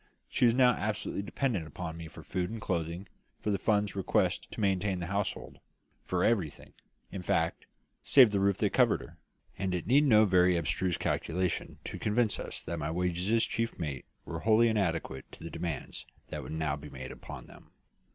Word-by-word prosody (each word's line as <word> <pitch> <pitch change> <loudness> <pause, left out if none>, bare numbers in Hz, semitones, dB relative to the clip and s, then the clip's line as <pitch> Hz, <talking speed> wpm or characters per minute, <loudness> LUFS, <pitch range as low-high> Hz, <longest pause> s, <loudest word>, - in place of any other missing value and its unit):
She - - +2
was 115 -1 +5
now 125 -1 +6
absolutely 105 -3 -2
dependent 100 - -1
upon 80 +2 -6
me 85 -1 -7
for 80 - -12
food 90 -1 -2
and 115 +1 -5
clothing, 85 -1 -2 0.3
for 105 - -1
the 100 - 0
funds 105 -1 +1
requisite 95 - +1
to - - -9
maintain 95 -2 +1
the 85 - -3
household 100 +2 -3 0.5
for 90 -1 0
everything, 95 -11 0 0.4
in 95 - -5
fact, 85 -2 0 0.3
save 130 -6 +7
the 100 - +1
roof 100 -1 +2
that - - +1
covered - - +4
her; - - -13 0.4
and 95 -1 0
it 90 - -3
needed 140 +5 +4
no 110 -2 +7
very 90 -2 +4
abstruse 85 +2 0
calculation 90 +1 -1
to - - -6
convince 110 +1 +1
us - - -5
that 85 +1 -4
my 75 0 -2
wages 90 +3 -1
as 115 0 +4
chief 115 0 -2
mate 75 -6 -4 0.2
were 85 -1 -5
wholly 115 +4 +4
inadequate 85 -10 -1
to - - -11
the 85 - -6
demands 85 -4 -5 0.2
that - - -4
would - - -8
now 80 -3 0
be 75 0 -10
made 65 -2 -7
upon - - -9
them. - - -16
95 Hz, 190 wpm, -31 LUFS, 85-105 Hz, 0.5 s, save